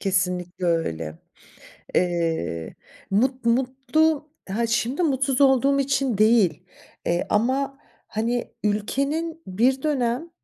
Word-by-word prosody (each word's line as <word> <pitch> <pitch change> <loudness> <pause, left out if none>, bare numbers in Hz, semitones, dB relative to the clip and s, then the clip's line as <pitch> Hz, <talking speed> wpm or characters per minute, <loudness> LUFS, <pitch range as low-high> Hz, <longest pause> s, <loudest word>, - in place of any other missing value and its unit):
kesinlikle 180 -2 -1
öyle. 80 - -1 0.8
Eee, 165 - -1 0.4
mut 255 +4 +1
mutlu, 270 +5 +1 0.2
ha, 230 +4 0
şimdi 240 +8 0
mutsuz 270 -2 +1
olduğum 275 +1 +4
için 275 -5 +1
değil, 215 -7 +4 0.4
eee, 175 +1 0
ama, 265 +6 +1 0.3
hani, 235 +2 -2
ülkenin 280 +11 -1
bir 250 +9 +1
dönem 270 +1 0
240 Hz, 100 wpm, -24 LUFS, 190-275 Hz, 0.8 s, olduğum